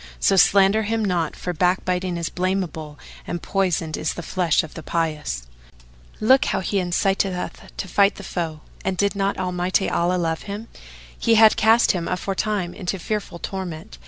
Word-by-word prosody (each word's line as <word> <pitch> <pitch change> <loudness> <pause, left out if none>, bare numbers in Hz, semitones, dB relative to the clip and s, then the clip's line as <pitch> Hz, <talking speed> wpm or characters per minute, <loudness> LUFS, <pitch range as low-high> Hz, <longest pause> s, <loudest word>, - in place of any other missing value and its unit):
So 195 - +3
slander 195 +3 +5
him 220 0 -1
not, 175 -5 0
for 180 - -4
backbiting 180 +1 0
is 170 -1 -2
blameable 180 -5 -2 0.3
and 175 - -3
poisoned 175 -4 -1
is 155 - -2
the 175 - -6
flesh 175 -4 +1
of 160 - -9
the 160 - -7
pious.[FN#443] - - -5
Look 265 +3 +6
how - - 0
he 200 +2 -1
inciteth 190 +1 +1
us 180 - -3 0.3
to 190 - -4
fight 200 +2 +3
the 200 - -10
foe; 165 -5 -4 0.2
and, 190 -1 -1
did 200 +2 +1
not 195 0 0
Almighty 180 +1 0
Allah 175 +2 +1
love 165 -2 -1
him, 210 +3 -6 0.5
He 230 -1 +2
had 220 0 +7
cast 225 +2 +5
him 175 -3 -3
aforetime 190 0 -2
into 195 -1 -3
fearful 200 -1 -4
torment." 185 0 -6
180 Hz, 170 wpm, -23 LUFS, 165-200 Hz, 0.5 s, had